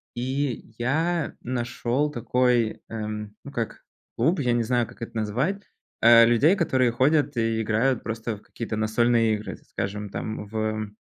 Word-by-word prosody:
и 130 -1 -2
я 160 +6 0
нашёл 125 +3 -1
такой, 125 -3 +1
эм, 105 -1 -5
ну, 140 - -8
как 115 -4 -4 0.3
клуб, 155 +10 +2
я 125 -3 +2
не 120 - +2
знаю, 120 +1 +1
как - - -16
это 115 - -6
назвать, 130 - -1 0.4
э, 115 0 +8
людей, 140 - +4
которые 130 -9 +2
ходят 135 +2 +2
и 115 -1 +1
играют 115 +4 +1
просто 115 -1 -4
в - - -18
какие-то 115 -2 -5
настольные 115 +1 +2
игры, 105 -2 -6
скажем, 105 +1 -3
там, 110 +1 -5
в, 110 0 -2
120 Hz, 150 wpm, -25 LUFS, 110-130 Hz, 0.4 s, э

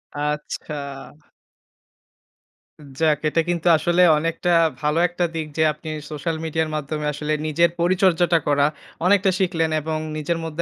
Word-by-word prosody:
আচ্ছা। 150 +1 -4 2.2
যাক, 155 -2 +3
এটা 165 - +2
কিন্তু 175 0 -1
আসলে 175 +3 +1 0.2
অনেকটা 165 +2 -1 0.3
ভালো 150 +2 +1
একটা 175 0 -3
দিক 160 -1 -3
যে, - - +2
আপনি 155 +1 -9 0.2
সোশ্যাল 160 +2 -3
মিডিয়ার 160 0 -1
মাধ্যমে 150 0 -3
আসলে 150 +1 -2
নিজের 170 +3 +3
পরিচর্যাটা 175 -2 +3
করা 145 -1 +3 0.4
অনেকটা 195 0 +4
শিখলেন 165 -4 0
এবং 155 +1 -3 0.2
নিজের 165 +2 -1
মধ্যে 160 +1 -4
160 Hz, 130 wpm, -22 LUFS, 150-175 Hz, 2.2 s, অনেকটা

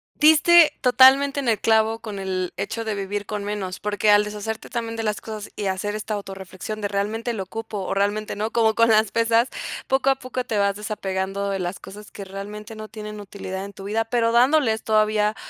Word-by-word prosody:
Diste 315 +2 +6
totalmente 270 +2 +5
en 270 - -3
el 225 -3 +1
clavo 220 0 +2
con 210 -3 -6
el 185 -2 -2
hecho 225 0 -3
de 220 -1 -2
vivir 205 +1 -4
con 210 -1 -4
menos, 200 -3 -4
porque 210 0 +1
al 205 0 +5
deshacerte 210 +1 -5
también 230 -1 -4
de 225 - -2
las 210 -1 -2
cosas 215 -2 -7
y 205 - -3
hacer 190 +2 -2
esta 215 0 -4
autorreflexión 195 +1 -7
de 205 - -1
realmente 215 +4 -2
lo 215 -5 -3
ocupo 225 +3 -6
o - - -2
realmente 205 +2 -1
no, 215 +2 -2
como 220 -2 +2
con 230 0 +4
las 220 -1 +4
pesas, 230 +1 +3 0.4
poco 265 0 +2
a 270 - +4
poco 255 -1 -5
te 225 -3 -3
vas 200 -1 +2
desapegando 200 -1 -3
de 195 -1 -2
las 180 +1 -4
cosas 210 +1 -12
que 200 - -8
realmente 210 +3 -8
no 215 0 -8
tienen 210 -1 -8
utilidad 195 -1 -6
en 200 - -8
tu 195 0 -11
vida, 220 +3 0
pero 230 0 0
dándoles 245 -2 +3
todavía 215 0 +2
215 Hz, 210 wpm, -23 LUFS, 200-225 Hz, 0.4 s, Diste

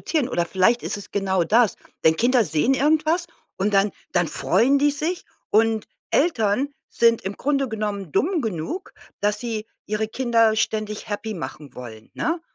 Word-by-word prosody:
vorbeiproduzieren 290 -6 -1
oder 175 -1 0
vielleicht 210 +7 +2
ist - - -2
es 205 - -8
genau 190 -3 +1
das. 220 +1 +3 0.3
Denn 160 0 +4
Kinder 240 +1 +3
sehen 160 - +2
irgendwas 310 +5 +2 0.3
und 200 +1 0
dann 195 +1 +4 0.2
dann 175 -1 +2
freuen 230 - +2
die 290 +1 +3
sich 315 +5 -3 0.3
und 220 0 +2 0.2
Eltern 255 - +2 0.2
sind 230 -1 +3
im 195 +2 -5
Grunde 275 -2 0
genommen 205 -5 -3
dumm 350 - +1
genug, 220 - -4 0.3
dass 205 0 +1
sie 225 -2 -4 0.2
ihre 215 +1 -2
Kinder 230 -3 +2
ständig 215 0 -2
happy 215 +1 -3
machen 150 -5 -8
wollen, 115 -3 -10
ne? 330 +2 -1
220 Hz, 165 wpm, -23 LUFS, 195-265 Hz, 0.3 s, Denn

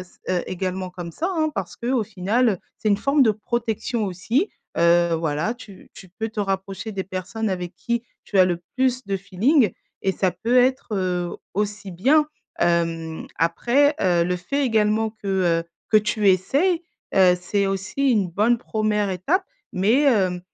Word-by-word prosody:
s 180 - -14
heu, 180 -1 +1
également 185 0 -3
comme 175 -2 -8
ça, 340 - -2
hein, 310 -1 +1
parce 190 -3 -4
qu'au 245 0 0
final, 215 +4 +1
heu, 200 -5 0 0.2
c'est 215 - -1
une 200 - +4
forme 275 +6 +3
de 225 - +5
protection 225 +1 -2
aussi, 220 - 0 0.3
heu, 170 0 +4
voilà. 160 +6 -1
Tu 210 -6 -14
tu 190 - -13
peux 220 +5 -4
te 220 -1 -4
rapprocher 195 +2 -3
des 190 -1 -3
personnes 195 +4 -3
avec 180 -1 -4
qui 235 -1 -2 0.2
tu 200 - -1
as 185 - +8
le 175 -1 -1
plus 255 -1 +1
de 195 - -1
feeling 205 - +2 0.3
et 190 - +1
ça 185 -1 +1
peut 230 +8 0
être, 260 +1 +3
heu, 180 -2 -1 0.2
aussi 205 0 -2
bien. 275 - +3 0.3
Hem, 165 -1 0
après, 245 - +2
heu, 175 -2 +3
le 180 +1 0
fait 275 +11 -1
également 220 -2 +2
que, 215 -2 -9 0.3
heu, - - -22 0.3
que 215 - +6
tu 210 -1 +1
essaies, 285 - +2 0.3
heu, 185 -2 +6
c'est 200 +2 0
aussi 195 +8 0
une 205 -6 +2
bonne 215 +7 +3
1re 215 -3 0
étape, 295 - 0 0.3
mais, 225 +10 +3
heu, 185 -7 +2
200 Hz, 175 wpm, -23 LUFS, 185-235 Hz, 0.3 s, as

